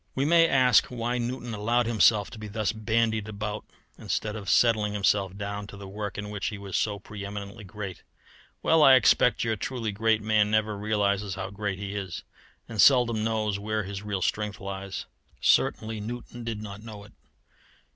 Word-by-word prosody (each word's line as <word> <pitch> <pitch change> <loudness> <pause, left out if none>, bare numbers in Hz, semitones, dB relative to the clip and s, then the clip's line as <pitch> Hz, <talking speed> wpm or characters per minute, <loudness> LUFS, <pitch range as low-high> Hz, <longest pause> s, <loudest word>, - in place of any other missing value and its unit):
We 135 - +1
may 165 +1 +5
ask 130 -5 +4
why 120 0 -2
Newton 120 0 -4
allowed 115 +3 +1
himself 110 -2 +3
to 115 - -10
be 105 - -7
thus 110 0 -1
bandied 110 -1 0
about 105 0 -5 0.3
instead 105 -1 -2
of 100 -3 -6
settling 110 -3 +3
himself 100 -1 +1
down 100 0 -5
to 100 - -10
the 100 -1 -9
work 105 +1 -5
in 105 0 -5
which 105 -2 -3
he 105 - -4
was 100 -2 -6
so 105 -2 0
pre 100 0 -9
eminently 100 +1 -7
great. 100 -1 -7 0.6
Well, 160 -1 +4
I 135 -3 +9
expect 125 -1 +4
your 115 -1 0
truly 115 +1 -3
great 110 +1 +1
man 105 -1 +3
never 110 0 +1
realizes 100 -2 0
how 95 0 -5
great 100 -1 -3
he 100 0 -5
is, 95 -5 -5 0.4
and 110 -3 0
seldom 120 -5 +5
knows 110 -2 -1
where 110 +1 -2
his 100 0 -6
real 100 -3 -3
strength 105 0 -2
lies. 95 -1 -6 0.3
Certainly 110 -1 +2
Newton 120 +2 -7
did 110 -2 -4
not 100 -1 -8
know 110 -2 -9
it. 105 - -16
105 Hz, 185 wpm, -27 LUFS, 100-115 Hz, 0.6 s, I